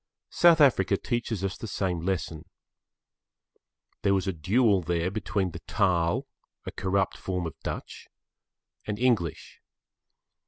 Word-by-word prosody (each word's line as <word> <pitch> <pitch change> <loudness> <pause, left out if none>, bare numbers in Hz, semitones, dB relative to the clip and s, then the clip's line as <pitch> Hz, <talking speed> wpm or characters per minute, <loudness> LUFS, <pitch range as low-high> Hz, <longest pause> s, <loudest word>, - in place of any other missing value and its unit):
South 170 -2 +5
Africa 105 -9 +4
teaches 115 -4 -3
us 95 -1 -1
the 115 - -6
same 95 -4 -1
lesson. 85 -3 -3 1.6
There 100 0 +3
was 95 0 -1
a 95 - 0
duel 100 +5 +2
there 85 +1 -1
between 100 -3 -1
the 85 - -8
Taal, 90 -6 +1 0.4
a - - -5
corrupt 95 0 0
form 90 -2 -3
of 80 - -4
Dutch, - - -6 0.8
and 105 -1 -2
English. 110 - -1
95 Hz, 125 wpm, -27 LUFS, 85-110 Hz, 1.6 s, South